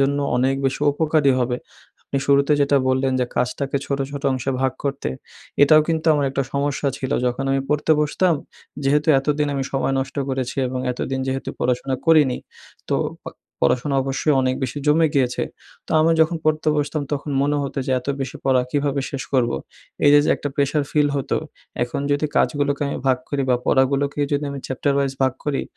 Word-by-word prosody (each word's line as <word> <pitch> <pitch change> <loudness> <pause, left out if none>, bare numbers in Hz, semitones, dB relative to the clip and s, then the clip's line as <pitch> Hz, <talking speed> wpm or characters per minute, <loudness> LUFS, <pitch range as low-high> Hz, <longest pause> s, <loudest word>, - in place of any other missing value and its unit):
জন্য 140 +1 +2 0.2
অনেক 130 +2 +2
বেশি 135 - -2
উপকারী 150 -2 +2
হবে। 125 -1 0 0.5
আপনি - - -4
শুরুতে 140 +1 +4
যেটা 140 0 +3
বললেন 130 0 +1
যে - - +2
কাজটাকে 135 +3 -1
ছোট, 140 0 -1
ছোট 140 0 -6
অংশে 130 +1 -2
ভাগ 130 -1 +1
করতে 140 - -2 0.5
এটাও 155 +2 +7
কিন্তু 160 -1 -1
আমার 145 -1 +1
একটা 135 0 -1
সমস্যা 140 0 0
ছিল। 130 - -4 0.2
যখন 125 +2 -1
আমি 135 0 +2
পড়তে 150 +2 +2
বসতাম, 165 +3 +2 0.5
যেহেতু 150 +3 +2
এতদিন 150 +2 0
আমি 135 -1 -1
সময় 135 0 0
নষ্ট 130 +1 -6
করেছি 130 -2 -3
এবং 130 0 -3
এতদিন 130 +2 -3
যেহেতু 135 0 -3
পড়াশোনা 125 +2 0
করিনি। 150 -6 +4 0.5
তো - - +3 0.3
প - - -37 0.4
পড়াশোনা 135 - 0
অবশ্যই 135 +2 0
অনেক 130 0 +1
বেশি 130 +3 -2
জমে 160 +2 +4
গিয়েছে। 130 -3 +1 0.4
তো - - -16
আমি 160 +1 +4
যখন 160 +1 +3
পড়তে 155 0 +1
বসতাম 150 +1 -1
তখন 145 +1 -3
মনে 145 +1 +1
হত 140 - -5
যে - - -2
এত 125 - -12
বেশি 135 -1 -4
পড়া 130 -2 +3
কীভাবে 145 -1 0
শেষ 135 -1 -4
করবো। 120 -3 +2 0.5
এই 145 - +7
যে, 145 - +8
যে - - 0
একটা 145 - -4
প্রেশার 145 +1 +1
ফিল 150 -1 +3
হত। 135 - -4 0.5
এখন 120 +3 -2
যদি 145 +2 +1
কাজগুলোকে 145 -1 +1
আমি - - -3
ভাগ 130 -1 +3
করি 140 -1 -1
বা 125 - +4
পড়াগুলোকে 140 +2 +2
যদি 145 +1 0
আমি 140 - -5
চ্যাপ্টার 135 +2 -1
ভাইস 135 -1 0
ভাগ 130 -1 +3
করি। 145 -2 -1
140 Hz, 190 wpm, -21 LUFS, 130-145 Hz, 0.5 s, যে